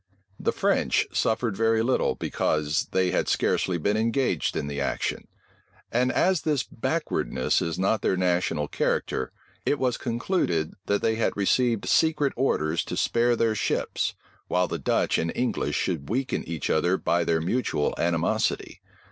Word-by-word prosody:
The - - +1
French - - +1
suffered 110 -1 0
very 115 +1 +2
little, 130 +2 +1
because 75 0 0
they 95 -1 +1
had - - 0
scarcely 90 -2 +1
been 100 +6 0
engaged 115 +4 0
in 75 - -2
the 70 -1 -3
action; 70 - -2 0.6
and 125 +2 +2
as 185 -3 +2
this 150 -5 0
backwardness 115 - -1
is 85 -1 -2
not 100 +4 +1
their 95 - +1
national 90 -4 +1
character, - - -1 0.3
it 145 - +1
was 125 -3 0
concluded, 115 - -1
that 100 0 +1
they 110 0 +1
had 115 - 0
received 115 +2 +1
secret 155 -4 +2
orders 85 -11 +1
to - - -4
spare 120 +1 +2
their 115 -1 +1
ships, 110 - -1 0.3
while 90 0 +1
the 85 - -4
Dutch - - +1
and 85 - -1
English 125 0 -1
should 80 -6 -2
weaken 130 +4 -1
each 80 -2 -3
other 85 +4 +2
by 85 -1 +1
their 80 -1 +1
mutual 85 -3 0
animosity. 85 -1 0
100 Hz, 155 wpm, -26 LUFS, 85-120 Hz, 0.6 s, very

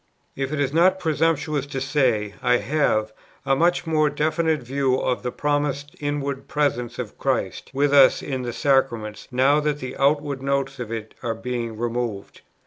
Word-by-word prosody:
If 135 0 -3
it 155 - -2
is 140 -1 0
not 185 +3 +4
presumptuous 155 -4 0
to 140 -2 -4
say, 130 -7 +1
I 125 -1 +3
have... 110 -3 0 0.3
a 135 - +3
much 170 +3 +2
more 155 -2 +2
definite 155 0 0
view 135 +1 +1
of 125 -1 -1
the 125 - -3
promised 145 0 -1
inward 140 -2 -3
Presence 140 -6 -1
of - - -6
Christ - - -1
with 140 +1 +1
us 135 -2 +6
in 130 -3 -3
the 120 -1 -3
Sacraments 120 -6 0
now 135 +3 +3
that 150 -1 0
the 130 -2 -6
outward 140 -1 +1
notes 140 0 -1
of 120 -2 -5
it 110 -1 -5
are 115 -2 -2
being 115 -1 -4
removed. 120 -3 -3
135 Hz, 170 wpm, -23 LUFS, 125-145 Hz, 0.3 s, us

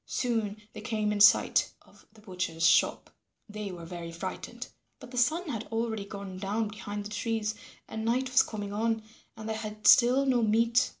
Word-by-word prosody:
Soon 225 -4 -1
they 215 - -8
came 215 -1 -1
in 205 -1 -1
sight 205 - +5
of - - -22
the 215 0 -19
butcher's 180 -5 -2
shop. - - +3 0.4
They 210 -2 -6
were 170 -2 -8
very 170 -1 -7
frightened. 165 - -6 0.3
But - - -12
the 250 - -7
sun 320 +9 +1
had 225 -4 -4
already 225 -2 -2
gone 200 -2 -8
down 210 +3 -1
behind 205 -1 -6
the 210 - -7
trees, 215 0 -2 0.3
and 220 - -5
night 250 +3 0
was 255 - +6
coming 205 -2 -5
on, 225 +1 0 0.3
and 220 0 -7
they 220 - -1
had 215 -1 -7
still 255 +3 +6
no 255 -3 +2
meat. 230 +2 +3
215 Hz, 185 wpm, -29 LUFS, 205-230 Hz, 0.4 s, was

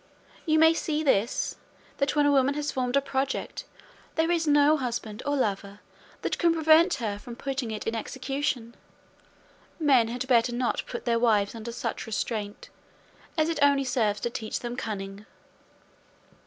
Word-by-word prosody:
You 315 0 +4
may 320 +1 +6
see 310 -1 -1
by 285 - +5
this, 210 +5 -1 0.4
that 280 +1 0
when 295 -1 +4
a 290 - +4
woman 275 0 +3
has 295 0 -2
formed 250 0 -1
a - - +3
project, 270 0 -3 0.5
there 325 +1 +2
is 330 -2 +1
no 295 +1 +5
husband 235 -5 -4
or 290 - +1
lover 200 -4 -2 0.4
that - - -2
can 335 -1 +3
prevent 320 +2 +5
her 215 -6 -3
from 235 +2 -9
putting 270 -2 -3
it 215 -1 -5
in 225 - -1
execution. 260 0 -3 1.1
Men 270 -7 +4
had 245 +2 -4
better 240 -1 +3
not 245 0 -1
put 240 - -6
their 235 -1 +2
wives 210 -4 +2
under 230 0 -6
such 230 -1 -4
restraint, 210 -1 -4 0.7
as 310 0 +3
it 330 -2 -2
only 280 -1 +4
serves 220 -5 0
to 240 - -2
teach 220 -2 -4
them 240 0 -4
cunning." 200 -2 -6
255 Hz, 170 wpm, -27 LUFS, 225-290 Hz, 1.1 s, may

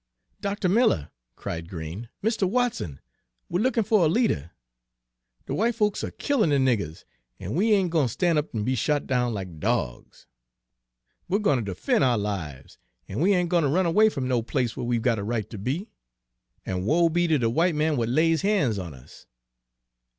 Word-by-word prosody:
"Dr. 200 -2 -1
Miller," 185 - +2 0.2
cried 85 0 -6
Green, 85 +7 -7
"Mr. 220 -4 +1
Watson, 230 - -1 0.5
we're 175 - 0
lookin' 245 -2 +2
fer 215 +2 +3
a 170 -5 +4
leader. 155 - +1 1.0
De - - -4
w'ite 230 +3 +1
folks 210 -3 0
are - - -2
killin' 275 - 0
de 145 - +3
niggers, 115 - 0 0.4
an' 95 - -5
we 210 - +3
ain' 195 -3 +3
gwine 160 -4 +2
ter 115 - -3
stan' 175 -2 +1
up 150 -4 -2
an' 105 - -1
be 130 +4 0
shot 145 +4 0
down 125 -2 0
like 95 -7 -6
dogs. 60 -4 -3 1.0
We're 195 - +2
gwine 145 - +1
ter 100 -2 -4
defen' - - +1
ou' 125 -3 +3
lives, 85 -10 -5 0.3
an' 100 - -5
we 195 +5 +4
ain' 180 -1 +1
gwine 170 0 +2
ter 145 - +1
run 180 +6 +2
away 205 +6 +5
f'm 135 -10 -3
no 125 -2 +1
place 120 0 -1
where 120 - -4
we 120 -1 +1
'we 115 - -4
got 115 -4 +2
a - - -4
right 110 -1 -2
ter 110 -2 -8
be; 150 - -3 0.7
an' 90 -1 -2
woe 165 +8 +4
be 175 +1 +1
ter 160 -2 +3
de 120 - -1
w'ite 165 +8 +2
man 155 +1 +1
w'at 120 -5 0
lays 160 +5 +2
ban's 190 - +1
on 85 -6 -7
us! 65 - -16
140 Hz, 200 wpm, -25 LUFS, -, 1.0 s, away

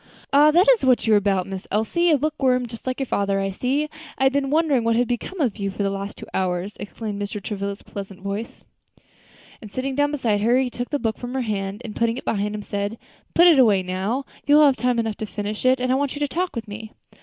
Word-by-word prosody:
"Ah! 295 +2 +7
that 345 +5 +5
is - - +2
what 255 -2 +3
you 220 - +4
are - - +7
about, 195 -2 +1
Miss 190 -1 -7
Elsie! 285 - +1
a 305 - +5
bookworm, 265 -4 +1
just 230 +2 -10
like 255 +1 -2
your 270 - 0
father, 200 -4 0
I 195 0 -1
see. 265 +9 -1 0.3
I - - 0
had 265 0 +4
been 280 -1 0
wondering 295 -5 +2
what 230 0 +2
had 245 +1 +2
become 245 +11 -4
of 245 -9 0
you 200 -2 -2
for 200 +1 -3
the 195 - 0
last 195 +1 -5
two - - -9
hours," 185 +1 -1
exclaimed 205 0 -5
Mr. 205 +1 -4
Travilla's 200 0 -5
pleasant 195 -1 -8
voice; 200 +4 -5 1.0
and 215 -3 -10
sitting 265 +3 -3
down 290 +2 +2
beside 230 -8 0
her, 235 +4 +3
he 260 -1 0
took 245 0 -5
the 290 - 0
book 225 -5 -2
from 245 +1 -6
her 265 - 0
hand, 200 -3 -3
and 215 - -7
putting 230 0 0
it - - -8
behind 210 0 -1
him, 210 - -5
said, 205 +3 -3 0.4
"Put 345 - +7
it 330 -6 +7
away 205 -7 +5
now; 195 +9 -2 0.2
you 290 - +6
will 300 0 +7
have 275 -2 +4
time 250 -1 0
enough 225 -2 -1
to 215 - -4
finish 210 +3 -3
it, 255 0 +4
and 255 0 0
I - - +3
want 280 +1 -1
you - - -5
to 290 - +2
talk 360 +5 -2
to 230 - -4
me." 220 +1 -9
230 Hz, 260 wpm, -23 LUFS, 205-270 Hz, 1.0 s, Ah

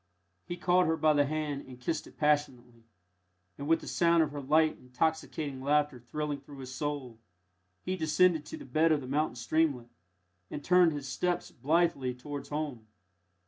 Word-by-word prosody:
He 175 - -4
caught 180 +1 +3
her 160 0 +1
by 155 -1 +4
the 145 -1 +3
hand 150 -2 -3
and 125 -1 -11
kissed 155 +5 -2
it - - -17
passionately; 125 -6 0 0.7
and 140 - -6
with 165 +1 +3
the - - -10
sound 170 -1 +3
of 150 - -3
her 145 -1 -5
light, 155 +3 +2
intoxicating 145 +1 -2
laughter 145 -1 +1
thrilling 145 +3 -4
through 140 0 -13
his 130 -1 -8
soul, 135 -5 -4 0.6
he 185 - -2
descended 160 0 +3
to - - -6
the - - -10
bed 155 +5 +2
of 150 -2 +2
the 130 - -8
mountain 145 0 0
streamlet, 125 0 0 0.6
and 145 - -6
turned 180 -2 +5
his 145 -2 -5
steps 180 +5 -1
blithely 145 -4 +1
towards 140 +2 -7
home. 145 -7 -4
150 Hz, 175 wpm, -30 LUFS, 130-160 Hz, 0.7 s, turned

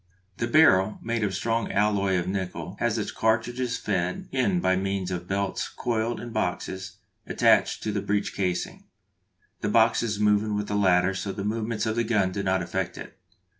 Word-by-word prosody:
The 120 - -1
barrel, 110 -8 +5
made 115 -1 -1
of 105 - +1
a 95 - -5
strong 115 +3 -1
alloy 100 -2 +2
of 85 - -2
nickel, 95 -1 -4
has - - +1
its - - -2
cartridges 120 +3 0
fed 90 -3 -2
in 175 +8 +1
by 95 - +2
means 95 -1 -2
of 90 -1 -4
belts 100 0 -2
coiled 115 0 -2
in 120 - -7
boxes 95 -2 -3 0.3
attached - - +3
to 110 - -1
the 100 -1 -1
breech 105 0 -1
casing, 90 -3 -2 0.7
the - - -1
boxes 115 -1 +2
moving 105 0 +2
with 105 0 -2
the 105 - -1
latter 95 -2 +3
so 95 +2 -4
that 95 - -5
the 100 - -3
movements 110 +1 -2
of 110 0 -1
the 120 - +1
gun 105 -5 +1
do 100 - -3
not 95 -2 +1
affect 95 +1 -3
it. - - -10
105 Hz, 190 wpm, -26 LUFS, 95-110 Hz, 0.7 s, barrel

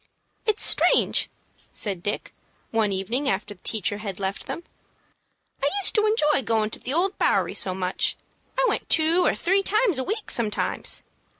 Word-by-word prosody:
"It's 430 -1 +3
strange," - - +4 0.4
said 195 -5 -3
Dick, 205 +3 -4 0.4
one 220 -2 +1
evening 230 +9 -1
after 205 -1 -2
the 180 - -26
teacher 205 -1 0
had 200 -3 -6
left 195 0 -4
them; 340 - -5 1.0
"I 280 - +2
used 395 - +2
to 430 -1 +2
enjoy 300 -10 +3
goin' 220 -2 0
to - - -8
the 255 - -5
Old 360 +6 0
Bowery - - +1
so 185 -1 0
much. 185 0 0 0.4
I - - +3
went - - -2
two 330 +3 +3
or - - +2
three 385 +3 +1
times 410 - +1
a - - -1
week 425 - -3
sometimes. 220 -3 0
245 Hz, 170 wpm, -24 LUFS, -, 1.0 s, strange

